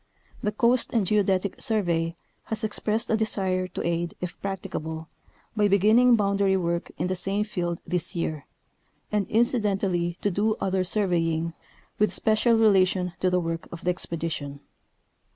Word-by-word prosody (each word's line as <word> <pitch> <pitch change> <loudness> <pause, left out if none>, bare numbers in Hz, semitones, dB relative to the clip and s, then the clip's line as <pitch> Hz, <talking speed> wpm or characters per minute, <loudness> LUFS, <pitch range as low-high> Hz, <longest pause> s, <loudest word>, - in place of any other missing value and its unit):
The 210 - 0
Coast 235 +3 +2
and 225 -5 +2
Geodetic 195 -1 +1
Surve}^ 170 -6 +1 0.3
has 220 - 0
expressed 220 +2 0
a - - +4
desire 190 -4 0
to - - -5
aid, 170 0 -1
if 180 -1 -6
practicable, 170 -5 -5 0.5
by 210 -1 +3
beginning 215 +5 +5
boundary 200 -2 +2
work 170 -1 -2
in 170 - -1
the 185 +1 -1
same 195 +3 -1
field 175 -5 -3
this 180 +1 -2
year, 155 -4 -3 0.6
and 210 -2 0
inci 235 +2 +2
dentally 185 -4 -1
to 205 - +1
do 210 +4 +1
other 190 -1 0
surveying 170 -4 0 0.5
with 210 -3 +3
special 220 +4 +3
relation 190 -5 +3
to 185 - +2
the 180 0 +2
work 165 -1 -4
of 170 - -9
the 180 - +3
expedition. 160 -5 -4
190 Hz, 150 wpm, -26 LUFS, 170-210 Hz, 0.6 s, beginning